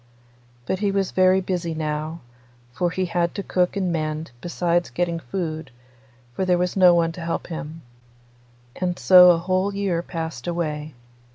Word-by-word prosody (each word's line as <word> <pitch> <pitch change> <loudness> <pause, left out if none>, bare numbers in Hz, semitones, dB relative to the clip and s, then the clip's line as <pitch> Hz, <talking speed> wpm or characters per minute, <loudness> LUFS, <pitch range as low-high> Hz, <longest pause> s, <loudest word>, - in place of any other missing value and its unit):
But 185 - -2
he 205 -1 +1
was 195 -1 0
very 185 0 +4
busy 175 -3 -3
now, 155 +1 -3 0.5
for 175 +7 0
he 185 +1 -2
had 170 -1 -1
to 200 - -3
cook 180 0 0
and 185 -3 0
mend, 155 -1 -3
besides 175 0 0
getting 170 -1 -1
food, 160 0 -4 0.6
for 190 - -2
there 180 -1 +2
was 180 0 -1
no 180 -2 +6
one 165 -1 +2
to 170 - -9
help 165 0 -3
him. 160 -1 -7 0.9
And 180 -1 -2
so 180 -1 +8
a 175 - +5
whole 185 +3 -1
year 195 -4 0
passed 160 -7 -6
away. 155 -4 -3
175 Hz, 165 wpm, -23 LUFS, 160-185 Hz, 0.9 s, so